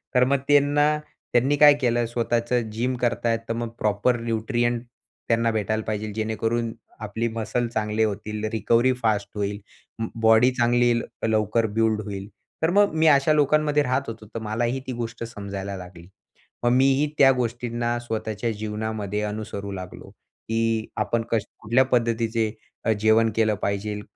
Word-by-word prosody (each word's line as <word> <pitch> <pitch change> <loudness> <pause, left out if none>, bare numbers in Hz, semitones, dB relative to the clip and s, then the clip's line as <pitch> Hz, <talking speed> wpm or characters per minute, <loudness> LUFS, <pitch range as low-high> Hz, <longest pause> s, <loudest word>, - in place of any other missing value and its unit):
तर 125 - +6
मग 140 +1 +2
त्यांना 145 +1 +4 0.4
त्यांनी 130 +4 +3
काय 145 0 +8
केलं. 120 -1 +2
स्वतःचं 120 0 -1
जिम 120 +4 -1
करताय, 120 -1 0
तर - - -1
मग 115 0 -3
प्रॉपर 105 +4 +1
न्यूट्रिएंट 120 +1 -1 0.4
त्यांना 115 0 +2
भेटायला 110 0 -1
पाहिजे, 110 0 -3
जेणेकरून 115 +1 -1 0.3
आपली 110 +2 -2
मसल्स 115 +1 -2
चांगले 110 0 0
होतील. 105 0 -3
रिकव्हरी 115 +3 +2
फास्ट 105 -3 +1
होईल. 100 0 -2 0.4
अं, 115 - -1
बॉडी 110 +3 +5
चांगली 120 -1 +2
येईल, 120 -1 +2 0.2
लवकर 110 +1 +1
बिल्ड 110 -1 +2
होईल. 100 -2 -6 0.3
तर 160 - +2
मग 205 -3 +4
मी 160 0 +3
अशा 145 0 +5
लोकांमध्ये 150 0 +3
राहत 130 0 +1
होतो. 110 -1 -7
तर 115 +2 -6
मलाही 120 +4 -1
ती - - -2
गोष्ट 115 -1 -5
समजायला 100 -3 -6
लागली. 90 -2 -11 0.6
मग 120 - +3
मीही 135 +2 +3
त्या 135 -1 +7
गोष्टींना 120 -1 -2
स्वतःच्या 110 -1 -3
जीवनामध्ये 105 -1 -3
अनुसरू 105 -1 -5
लागलो, 95 -2 -8
की 115 0 -3
आपण 115 -1 0
कस 110 -3 +1
कुठल्या 120 +5 +3
पद्धतीचे 115 -3 0 0.3
अ, 115 - +3
जेवण 110 +1 +4
केलं 110 -1 +2
पाहिजेल. 105 +1 -2
115 Hz, 150 wpm, -24 LUFS, 110-120 Hz, 0.6 s, काय